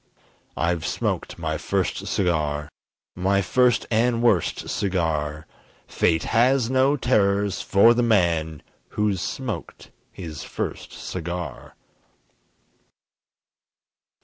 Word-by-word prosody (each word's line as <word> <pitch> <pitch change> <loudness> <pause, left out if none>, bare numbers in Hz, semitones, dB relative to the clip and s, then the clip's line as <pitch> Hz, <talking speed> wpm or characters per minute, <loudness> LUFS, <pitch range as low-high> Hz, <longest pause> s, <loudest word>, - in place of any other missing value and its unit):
I've 85 -1 0
smoked - - -2
my - - -3
first - - -2
cigar! 75 -5 0 0.5
My 95 +2 +1
first 125 +4 +2
and 115 +1 +2
worst 105 -9 +1
cigar! 80 -5 -1 0.4
Fate 80 -1 +1
has 125 +1 +2
no 135 +2 +3
terrors 100 -5 +1
for 105 +4 +5
the 120 - +1
man 85 -9 +1 0.3
Who's 105 -4 +1
smoked 130 0 -5 0.2
his 80 -5 -7
first - - -5
cigar! 85 -1 -6
100 Hz, 95 wpm, -24 LUFS, 85-115 Hz, 0.5 s, for